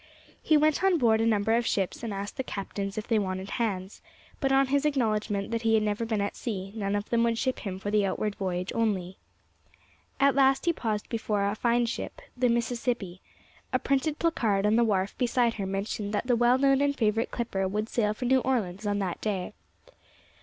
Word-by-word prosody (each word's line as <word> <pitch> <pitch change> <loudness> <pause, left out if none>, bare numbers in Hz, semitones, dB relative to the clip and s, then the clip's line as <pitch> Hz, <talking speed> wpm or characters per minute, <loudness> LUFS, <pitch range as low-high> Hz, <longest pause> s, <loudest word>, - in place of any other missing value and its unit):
He 310 - +4
went 310 +3 +2
on 380 -2 +4
board 225 -5 +3
a 225 - +2
number 220 0 +2
of 235 0 +1
ships 190 -3 -1
and 230 -2 -4
asked 200 +4 -5
the 265 - -1
captains 195 -2 -5
if 215 - -4
they 225 -3 +2
wanted 190 -1 -3
hands, 195 -3 -3 0.4
but 270 -2 +1
on 270 0 +5
his 280 +1 +2
acknowledgment 215 -7 0
that 230 -1 -1
he 225 -1 +3
had 215 - +3
never 210 +2 -1
been 220 -2 -1
at 200 - -2
sea, 195 -5 -4
none 200 -2 -1
of 205 +1 -4
them 235 -1 +3
would 230 -1 +1
ship 260 +2 -1
him 190 -3 -5
for 205 +2 -4
the 210 -1 +3
outward 200 +2 -1
voyage 185 -2 -3
only. 190 -5 -1 1.0
At 275 0 +5
last 270 +1 +3
he 340 - +3
paused 215 -8 -3
before 210 -3 -1
a 200 - 0
fine 235 +2 +1
ship, 235 - -5 0.2
the 250 -1 +2
Mississippi; 235 -5 -1 0.5
a - - +3
printed 285 +3 0
placard 220 -12 +1
on 210 +1 +3
the 235 - +4
wharf 200 -3 0
beside 240 -1 +2
her 195 - -2
mentioned 200 +2 -3
that 205 - -1
the 250 -1 +2
well 240 +2 +4
known 275 0 +3
and 285 0 +1
favourite 225 0 +1
clipper 195 -5 -2
would 210 +3 -2
sail 215 -3 0
for 250 - -4
New 260 +2 +4
Orleans 215 -6 -1
on 205 0 0
that 190 -4 -3
day. 195 -4 -2
220 Hz, 210 wpm, -28 LUFS, 200-245 Hz, 1.0 s, on